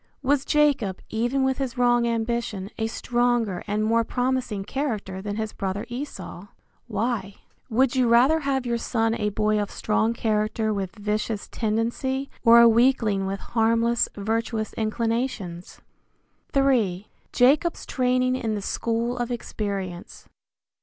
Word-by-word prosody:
Was 280 +1 +2
Jacob, 280 -11 +2
even 240 +5 0
with 265 0 0
his 265 -2 -3
wrong 240 -1 +3
ambition, 230 -3 -2
a 220 - 0
stronger 240 -5 0
and 210 +1 0
more 230 +1 +2
promising 245 -4 -1
character 215 -9 -3
than 205 0 -4
his 220 -1 -3
brother 195 +1 -3
Esau? 240 -7 -7 0.4
Why? 210 -3 -2 0.3
Would 255 +3 +2
you 255 -2 +3
rather 255 +7 +5
have 275 -3 -1
your 235 -1 -1
son 225 -1 0
a 210 -2 -1
boy 210 +1 +1
of 205 - -3
strong 220 +2 0
character 215 0 0
with 195 -1 -4
vicious 210 0 -2
tendency 240 +5 -1
or 235 +1 +8
a 235 - +8
weakling 225 -4 +3
with 195 0 -4
harmless, 230 +1 +1
virtuous 220 +1 -2
inclinations? 225 -5 -3 0.8
III. 220 -9 +2 0.2
JACOB'S 290 +7 +3
TRAINING 255 0 +1
IN 225 -4 -2
THE 205 - -4
SCHOOL 235 +3 -1
OF 240 0 -2
EXPERIENCE. 200 -6 -5
230 Hz, 135 wpm, -25 LUFS, 210-245 Hz, 0.8 s, or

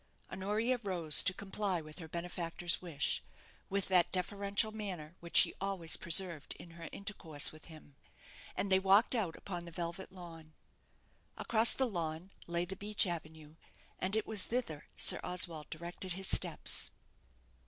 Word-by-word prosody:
Honoria 210 +6 -1
rose 175 -7 +4
to 185 - +3
comply 195 -1 -3
with 155 +2 -11
her 165 - -8
benefactor's 170 -1 -2
wish, 160 -6 -1 0.5
with 200 0 -1
that 180 -3 +3
deferential 200 +3 0
manner 185 -8 -6
which 170 0 -1
she - - +7
always 190 -5 -1
preserved 170 -3 +2
in 170 - -12
her 165 -1 -9
intercourse 170 -8 0
with 155 0 -14
him, 155 -3 -14 0.6
and 200 - -2
they 190 - +5
walked 195 +5 +4
out 205 -9 -1
upon 175 -3 -6
the 170 - -10
velvet 170 +2 -5
lawn. 165 -4 -11 0.8
Across 225 0 +5
the 265 - +1
lawn 170 -4 -4 0.2
lay 170 +1 -1
the 190 +2 -5
beech 205 +2 +2
avenue, 160 -3 -7 0.4
and 190 +3 0
it 220 - 0
was 215 -3 0
thither 225 -12 -3
Sir - - +5
Oswald 175 -4 -2
directed 175 +3 -5
his 190 +1 -5
steps. - - +3
180 Hz, 155 wpm, -34 LUFS, 165-200 Hz, 0.8 s, she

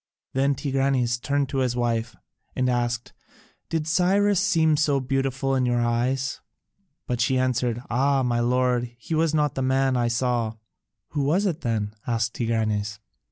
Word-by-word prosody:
Then 135 +1 +2
Tigranes 135 -4 0
turned 140 0 0
to 135 - -1
his 125 -2 0
wife 120 -1 -1 0.4
and 130 -1 +1
asked, 120 -1 -2 0.6
"Did 160 -2 -1
Cyrus 190 +4 +3
seem 160 -5 +3
so 145 -2 +2
beautiful 135 0 -1
in 130 -1 +2
your 120 -1 +1
eyes?" 125 +3 0 0.6
But 120 -1 -2
she 130 +2 +2
answered, 125 -2 0
"Ah, 135 +3 +2
my 120 -1 +1
lord, 125 0 +1
he 120 - -6
was 160 0 +2
not 150 -2 +1
the 135 - -3
man 130 0 +2
I 120 -1 +1
saw." 120 -2 0 0.5
"Who 145 - -2
was 165 +9 +2
it 175 -4 -1
then?" 110 -3 -1
asked 115 0 0
Tigranes. 110 -3 -1
130 Hz, 160 wpm, -25 LUFS, 120-140 Hz, 0.6 s, Cyrus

